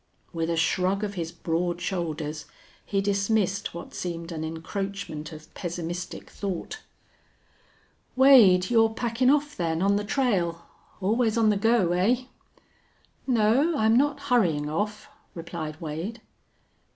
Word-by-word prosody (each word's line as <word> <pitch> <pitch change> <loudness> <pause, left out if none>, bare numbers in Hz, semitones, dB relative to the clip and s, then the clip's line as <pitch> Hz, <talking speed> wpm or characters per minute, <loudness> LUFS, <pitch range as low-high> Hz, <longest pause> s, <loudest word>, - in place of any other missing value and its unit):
With 165 0 -2
a 170 - +1
shrug 185 +5 +1
of 205 -1 -2
his 170 -3 -4
broad 170 +1 -2
shoulders 160 -4 -3 0.4
he 195 -1 -1
dismissed 200 -1 0
what 170 - -8
seemed 170 -1 -5
an 160 -1 -4
encroachment 165 0 -5
of 155 +1 -12
pessimistic 175 0 -5
thought. 200 - -5 1.4
"Wade, 240 -9 +6
you're 225 -1 +5
packin' 235 +3 0
off, 295 +1 +2
then, 165 -2 -1
on 200 +2 +3
the 205 - -2
trail? 205 -9 0 0.4
Always 220 +3 +1
on 225 -2 +4
the - - +1
go, 225 -4 +3
eh?" 215 +9 +2 1.0
"No, 255 +7 +3
I'm 220 +1 +3
not 285 +2 +2
hurryin' 160 -11 +2
off," 210 +5 -3 0.3
replied 165 -2 -6
Wade. 165 +9 -5
190 Hz, 125 wpm, -26 LUFS, 165-225 Hz, 1.4 s, Wade